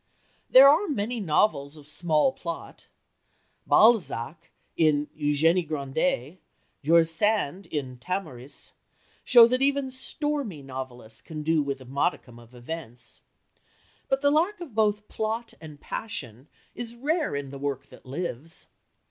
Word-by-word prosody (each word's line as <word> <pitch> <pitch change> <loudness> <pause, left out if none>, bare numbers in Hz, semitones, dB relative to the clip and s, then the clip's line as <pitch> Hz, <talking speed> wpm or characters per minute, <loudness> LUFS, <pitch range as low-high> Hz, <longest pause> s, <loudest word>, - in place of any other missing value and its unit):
There 265 +2 +9
are 320 +9 +5
many 240 -3 -2
novels 155 -5 +1
of 145 -1 -13
small 160 - +2
plot. 170 -9 -8 0.8
Balzac, 165 - +3 0.3
in 150 -2 +3
Eugénie 160 +4 +2
Grandet, 150 +1 -2 0.4
George 165 +3 +5
Sand, 185 0 0
in 130 -5 -5
Tamaris, 150 -6 -5 0.5
show 240 -2 +8
what 255 +2 +1
even 275 -1 +1
"stormy" 260 - -2
novelists 130 -4 -8
can 155 -2 -7
do 160 0 +2
with 140 -2 -3
a - - -11
modicum 130 -2 -2
of 120 +1 -17
events. 125 -1 -8 0.9
But 270 +1 0
the 285 - +5
lack 345 +8 +1
of 335 -9 -9
both 210 -1 +1
plot 225 +2 -3
and 150 -3 -11
passion 130 - -6 0.3
is 235 -1 -5
rare 300 - -1
in 140 -1 -4
the 140 - -8
work 140 -1 -3
that - - -16
lives. 155 +2 -6
165 Hz, 130 wpm, -26 LUFS, 140-225 Hz, 0.9 s, There